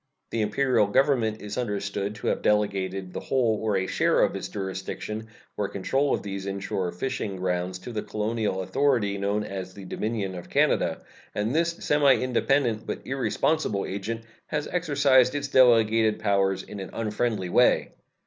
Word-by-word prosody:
The 115 - 0
Imperial 110 +1 +2
Government 110 -2 +2
is 105 +3 -4
understood 100 -2 -2
to 105 - -5
have - - -1
delegated 95 -3 0
the - - -3
whole 115 -5 +1
or 110 -3 +1
a 95 - 0
share - - +2
of - - +1
its - - -4
jurisdiction 100 +3 -5 0.3
or 105 - -1
control 135 +9 0
of - - 0
these 100 -1 -5
inshore 95 -2 -2
fishing 110 0 -3
grounds 90 0 -2
to 90 +7 -8
the 110 -2 -2
colonial 105 -2 -2
authority 115 -5 +1
known 100 +2 0
as 95 -2 -6
the 100 -2 -9
Dominion 105 0 -3
of 90 -1 -8
Canada, - - +1 0.3
and 105 +4 -1
this 170 +2 +2
semi 145 -2 +5
independent 125 -2 +1
but - - -5
irresponsible 135 -4 0
agent 105 +4 -4 0.3
has 150 -1 -2
exercised 140 -7 +3
its 145 -1 -2
delegated 115 -4 +5
powers 100 -2 +1
in 105 - -9
an 95 - -6
unfriendly 110 -3 -1
way. 125 +7 +3
105 Hz, 160 wpm, -26 LUFS, 100-125 Hz, 0.3 s, semi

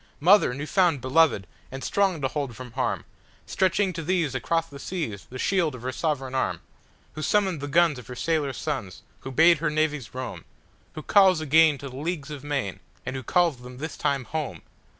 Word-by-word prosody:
Mother! 180 -5 +5
new 145 +2 -4
found, 175 -4 +2
beloved, 130 -4 +3 0.3
and 135 +1 -6
strong 195 -6 +1
to 135 - +1
hold 135 -4 -4
from 125 0 -9
harm, - - -2 0.4
Stretching 190 0 +1
to 165 - -4
these 165 -4 0
across 160 +7 0
the 140 -3 -11
seas 145 - -4
the 130 - -7
shield 170 -1 +1
of 120 - -11
her 130 - -2
sovereign 135 -3 -2
arm, 130 - -1 0.5
Who 155 - -6
summoned 190 -3 +1
the 145 - -4
guns 160 -2 +3
of 120 - -13
her 125 - -7
sailor 155 0 0
sons, 130 - -5 0.2
who - - -7
bade 165 +3 +5
her 155 -1 0
navies 150 -5 -1
roam, 130 0 -5 0.5
Who 155 - -6
calls 190 -4 +5
again 155 0 +4
to 140 - -8
the 130 - -10
leagues 155 -1 -4
of 145 -2 -7
main, 140 -10 -2 0.3
and 130 - -4
who 130 - -3
calls 170 +3 +2
them 125 +1 -11
this 155 +3 -5
time 140 -2 0
home! 130 - -5
150 Hz, 200 wpm, -26 LUFS, 130-165 Hz, 0.5 s, Mother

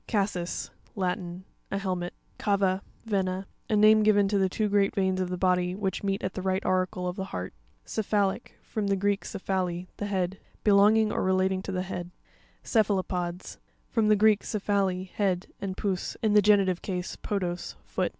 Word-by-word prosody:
Cas'sis.—Latin. 185 -2 -3 0.2
A 195 - -1
helmet 185 -3 -3 0.2
(page - - -9
54). 200 -1 +4
Ca'va 190 -1 +1 0.2
(Vena).—A 195 0 -2
name 215 +1 +6
given 205 -1 +4
to 200 -1 +2
the 190 -1 +2
two 215 +3 0
great 200 0 +2
veins 190 -2 +1
of 185 - -1
the 180 - -2
body, 180 -1 +2
which 195 -1 -2
meet 195 -1 -1
at 185 - -2
the 185 - -4
right 190 +1 -1
auricle 185 -1 0
of 180 - -3
the 190 - -2
heart. 90 - -5 0.3
Crpua'Lic.—From 210 0 -1
the 200 - +2
Greek, 200 +1 0
kephale, 185 -2 -2
the 205 - -3
head. 190 -1 -1 0.2
Belonging 210 +1 +5
or - - -1
relating 190 0 +2
to 195 - -5
the 185 -1 -1
head. 180 -2 -5 0.5
A - - -19
Ce'puaropops - - -6
(ke'f 215 - +3
a - - +3
lo 190 -1 +1
pods)—From 180 +5 -3
the 215 - +6
Greek, 215 0 +4
kephale, 195 -3 0
head, 185 -2 0 0.2
and 190 -1 -4
pous, 190 -3 -2
in 215 -2 +3
the 210 - +7
genitive 195 -3 +4
case, 180 -2 -3
podos, 180 -4 -3
foot. - - -1
190 Hz, 185 wpm, -28 LUFS, 185-205 Hz, 0.5 s, the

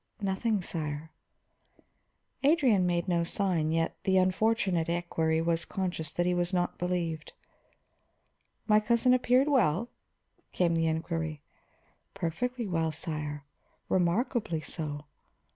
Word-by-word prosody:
"Nothing, 200 +1 0
sire." 155 -2 -4 1.3
Adrian 270 - +4
made 175 +1 0
no 170 -2 +2
sign, 170 -4 0
yet 165 0 0
the 190 -1 +3
unfortunate 185 -2 +2
equery 165 -2 0
was 165 0 +1
conscious 180 -4 -3
that 175 - 0
he 180 - +2
was 175 0 0
not 175 0 -1
believed. 170 -3 -2 1.3
"My 215 -1 +5
cousin 235 +3 +3
appeared 255 +2 +3
well?" 235 - +2 0.6
came 175 -2 +2
the 165 0 +2
inquiry. 160 -2 -2 0.7
"Perfectly 235 +8 -2
well, 165 -4 0
sire. 150 -2 -4 0.5
Remarkably 185 - +1
so." 150 -3 -5
175 Hz, 110 wpm, -29 LUFS, 160-205 Hz, 1.3 s, My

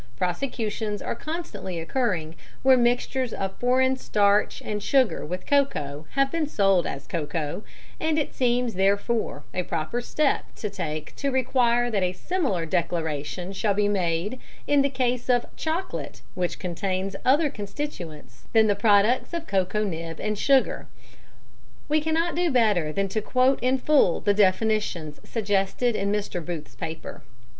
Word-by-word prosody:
Prosecutions 210 - -2
are - - -2
constantly 230 - -5
occurring 165 -4 -1 0.3
where 265 0 +7
mixtures 245 0 +1
of 195 0 -3
foreign 260 +1 +2
starch 205 -4 +2
and 210 -1 -3
sugar 260 +1 +2
with 180 +4 -5
cocoa 155 - 0
have 275 0 +2
been 325 -3 0
sold 195 - +3
as 140 +1 -5
'cocoa,' 150 +1 -3 0.4
and 315 -1 +1
it 300 - -1
seems, 245 -2 +1
therefore, 200 -4 0
a 180 - 0
proper 170 +7 -2
step 285 +4 +1
to 210 - -4
take 155 -6 -5
to 280 - 0
require 245 -2 +2
that 205 -3 +1
a 180 0 +1
similar 235 - -1
declaration 170 +1 -2
shall 200 0 0
be 205 0 +2
made 190 +4 0 0.3
in 290 -1 +4
the 280 - +2
case 250 -2 -1
of 245 -1 +3
'chocolate' 315 - -3
which 180 -1 -2
contains 185 +2 -2
other 290 +3 +4
constituents 175 - -7
than 220 -1 +6
the 205 - +3
products 210 +8 +3
of 335 -1 -4
cocoa 195 - 0
nib 165 -4 -4
and 215 0 -1
sugar." 275 -2 +2 1.0
We 305 +1 +2
cannot 320 +2 0
do 350 +2 +1
better 210 - +2
than 195 +5 0
quote 255 +6 +2
in 255 +2 +2
full 265 - +3
the 205 - +2
definitions 200 -5 +1
suggested 210 +2 0
in 200 0 0
Mr. 205 -4 -2
Booth's 160 -4 -6
paper. 160 0 -7
210 Hz, 150 wpm, -25 LUFS, 180-255 Hz, 1.0 s, where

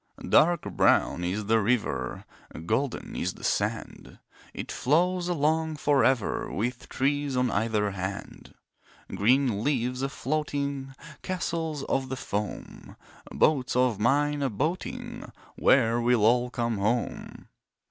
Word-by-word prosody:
Dark 170 0 +4
brown 90 - +2
is 100 +4 -2
the 110 +2 +3
river, 115 +2 -1 0.4
Golden 120 +7 -2
is - - -2
the - - -14
sand. - - -2 0.3
It - - -6
flows 175 +5 +1
along 160 -1 +1
for 145 -2 +2
ever, 130 -6 +1
With 120 +5 -3
trees 140 0 0
on 125 -2 +1
either 105 -1 0
hand. 95 +1 -6 0.6
Green 120 -1 +2
leaves 125 -2 0
a 135 - -1
floating, 140 -1 -3 0.3
Castles 165 -5 -3
of 130 -1 -1
the 130 - -3
foam, 105 -4 -5 0.4
Boats 135 -6 +2
of 125 -4 +2
mine 145 +5 +2
a 135 - +1
boating— 155 - -4 0.2
Where 120 -2 +3
will 120 -2 +3
all 120 +2 +3
come 115 -4 -2
home? 115 +4 -2
130 Hz, 125 wpm, -27 LUFS, 115-145 Hz, 0.6 s, Dark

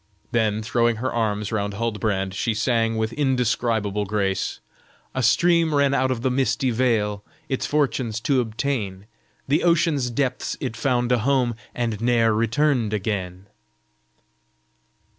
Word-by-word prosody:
Then, 110 -2 +1
throwing 115 +1 +1
her 125 +4 -3
arms 105 -2 -1
round 100 -2 -2
Huldbrand, 105 -4 -1
she 110 +3 -1
sang 115 0 +1
with 110 +1 -1
indescribable 115 -6 0
grace: 100 -2 -1 0.5
"A 130 - -1
stream 165 +7 +3
ran 140 -1 +3
out 130 -1 +2
of 125 -2 -2
the 130 - +1
misty 130 0 +1
vale 110 -4 0 0.3
Its 135 - -1
fortunes 130 -6 0
to 130 0 +2
obtain, 110 -4 -3 0.4
the 145 +4 +2
ocean's 165 -6 +2
depths 125 +1 -2
it 125 -4 -4
found 120 0 0
a 125 - +3
home 125 0 +1 0.2
And 115 -3 -2
ne'er 115 -2 +3
returned 115 +1 +1
again." 95 -3 -3
115 Hz, 135 wpm, -23 LUFS, 105-130 Hz, 0.5 s, stream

